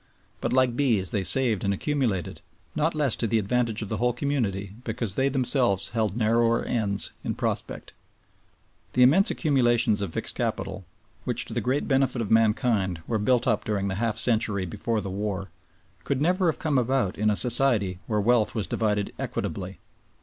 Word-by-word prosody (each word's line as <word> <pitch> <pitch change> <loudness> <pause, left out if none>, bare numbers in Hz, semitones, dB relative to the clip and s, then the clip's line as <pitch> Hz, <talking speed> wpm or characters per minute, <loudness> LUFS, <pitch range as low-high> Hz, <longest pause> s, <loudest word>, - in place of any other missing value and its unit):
But - - -2
like 130 -1 +2
bees 115 -9 +1
they 100 - -1
saved 120 -1 +4
and 100 - +1
accumulated, 120 - -2 0.3
not 155 +2 0
less 145 -6 +1
to 115 - 0
the 115 - +1
advantage 110 +1 -1
of 105 - -7
the - - -2
whole 125 0 +1
community 110 -8 -2
because 115 -4 -4
they 135 +5 +1
themselves 125 -6 0
held 110 -2 -1
narrower 115 +1 +2
ends 100 -4 +1
in - - -3
prospect. - - -4 1.0
The 125 - +4
immense 165 +11 +5
accumulations 120 - +2
of 100 -4 -3
fixed - - -4
capital - - -4 0.4
which, - - -1
to - - -8
the - - -1
great 130 +3 -1
benefit 135 -2 +1
of 110 -4 -3
mankind, 110 - +1
were 110 -2 -1
built 120 +3 +2
up 115 -4 +1
during 100 -2 -2
the 95 - -3
half 115 -2 -1
century 110 -5 0
before 110 +5 -2
the 95 - -6
war, 100 -2 -4 0.5
could 140 - -1
never 180 +4 +1
have - - -11
come 150 -5 0
about 125 -5 0
in 105 0 +2
a 105 - +1
Society 115 -7 +3
where 105 -2 0
wealth 115 +1 +2
was 110 -3 -1
divided 105 -2 -1
equitably. - - -4
115 Hz, 180 wpm, -25 LUFS, 100-130 Hz, 1.0 s, immense